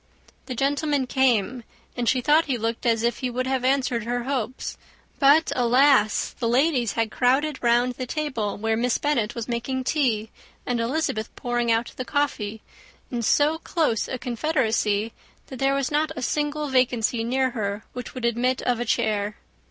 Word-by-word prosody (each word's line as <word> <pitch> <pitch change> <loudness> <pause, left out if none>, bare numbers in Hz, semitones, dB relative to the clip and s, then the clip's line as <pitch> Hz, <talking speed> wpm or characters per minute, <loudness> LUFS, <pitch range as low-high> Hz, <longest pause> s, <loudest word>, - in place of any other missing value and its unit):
The 255 - -4
gentlemen 285 +1 0
came; 250 -2 +1 0.3
and 240 -1 0
she 255 - +2
thought 305 +5 +4
he 265 -4 -1
looked 230 +2 -2
as 230 -1 +2
if 235 0 0
he 255 - -2
would 255 +1 -2
have 260 -1 -1
answered 255 -3 +1
her 245 +1 -2
hopes; 255 -2 -3 0.4
but, 290 +3 +5
alas! 250 -2 +3
the 230 - 0
ladies 250 -3 +2
had 225 -1 -1
crowded 265 +4 +1
round 240 +1 +3
the 255 +1 -6
table, 245 -9 -2
where 220 +2 0
Miss 240 +1 +1
Bennet 240 -7 0
was 235 -1 -4
making 245 +2 -2
tea, 235 -7 0 0.3
and 245 -1 -1
Elizabeth 230 -3 -1
pouring 240 -1 -1
out 230 +1 0
the 255 - -2
coffee, 220 -7 -2 0.5
in 240 -2 -2
so 295 +7 +2
close 310 -11 0
a 260 - -3
confederacy, 230 -5 0 0.3
that 260 - -9
there 270 0 +2
was 275 0 -1
not 300 +1 +1
a 255 - -5
single 295 +2 -1
vacancy 245 -3 +1
near 260 +2 +1
her 205 -3 -3
which 250 +1 -7
would 250 -2 -3
admit 245 +2 0
of 245 -2 0
a 240 - -1
chair. 210 -2 0
250 Hz, 175 wpm, -24 LUFS, 230-270 Hz, 0.5 s, but